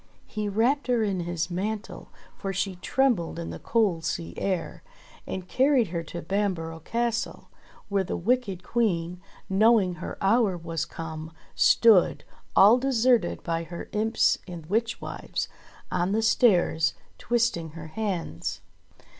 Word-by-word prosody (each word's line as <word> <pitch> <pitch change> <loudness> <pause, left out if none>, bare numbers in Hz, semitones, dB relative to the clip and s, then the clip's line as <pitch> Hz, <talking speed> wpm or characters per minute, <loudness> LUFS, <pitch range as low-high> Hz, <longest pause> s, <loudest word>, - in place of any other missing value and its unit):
He 210 -1 -3
wrapped 245 +8 +1
her 240 -3 +2
in 195 -3 -1
his 175 0 -3
mantle, 210 +4 -4 0.3
for 195 - -4
she 185 -1 -2
trembled 220 -4 +1
in 170 -1 -5
the - - -7
cold 205 -8 +1
sea 165 +2 -3
air, 190 -3 -2 0.5
and 185 -1 -5
carried 260 - +3
her 170 -1 -2
to 170 +2 -7
Bamborough 170 -4 -2
Castle, 235 +6 -2 0.4
where 200 -1 +1
the - - -3
wicked 205 -3 0
Queen, 180 -6 -1 0.3
knowing 195 -2 +3
her - - -5
hour 200 -2 +3
was 165 -1 -3
come, 160 -1 -7 0.2
stood, 220 -6 +5 0.3
all 215 +6 +7
de 270 - -2
serted 240 -6 +2
by 165 -1 -1
her 170 +1 -8
imps 220 +2 +2
and 170 -3 -8
witch 225 +7 -1
wives, - - -4 0.4
on 180 +3 0
the 220 +1 +1
stairs, 180 -8 +3 0.2
twisting 225 -10 0
her 160 -1 -8
hands. 130 - -3
195 Hz, 140 wpm, -26 LUFS, 170-225 Hz, 0.5 s, all